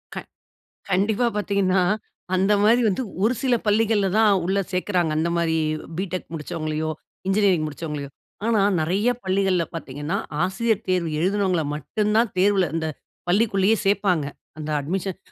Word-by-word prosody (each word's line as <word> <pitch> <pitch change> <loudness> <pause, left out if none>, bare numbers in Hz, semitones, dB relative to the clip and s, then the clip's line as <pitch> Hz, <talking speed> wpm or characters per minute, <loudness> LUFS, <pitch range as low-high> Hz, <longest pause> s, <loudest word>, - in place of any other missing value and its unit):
க - - -5 0.7
கண்டிப்பா. 205 +5 +2
பாத்தீங்கன்னா, 195 -2 +1 0.5
அந்த 195 +3 +3
மாரி 235 +4 +5
வந்து, 200 +6 -1 0.2
ஒரு 225 +4 +3
சில 250 -2 +3
பள்ளிகள்ல 210 -1 +3
தான் 220 -1 +6 0.2
உள்ள 190 +2 +1
சேக்கிறாங்க. 180 -3 0
அந்த 160 +2 +1
மாரி 165 -1 +1 0.4
பிடெக் 185 -1 -4
முடிச்சவங்களயோ, 155 0 -3 0.4
இன்ஜினியரிங் 195 -5 +3
முடிச்சவங்களயோ. 150 -1 -5 0.4
ஆனா 225 -3 +3 0.2
நெறைய 190 +9 +1
பள்ளிகள்ல 190 -2 +1
பாத்தீங்கன்னா, 145 -1 -4 0.3
ஆசிரியர் 215 +3 0
தேர்வு 180 -3 +1
எழுதினவங்கள 190 -1 +1
மட்டும் 210 +9 -1
தான் 230 -2 +3
தேர்வுல 195 0 +4
இந்த 160 -1 -1 0.4
பள்ளிக்குள்ளயே 200 +2 +3
சேர்ப்பாங்க. 195 -6 +2 0.3
அந்த 155 0 -5
அட்மிஷன் 185 +5 -3
190 Hz, 130 wpm, -23 LUFS, 165-205 Hz, 0.7 s, தான்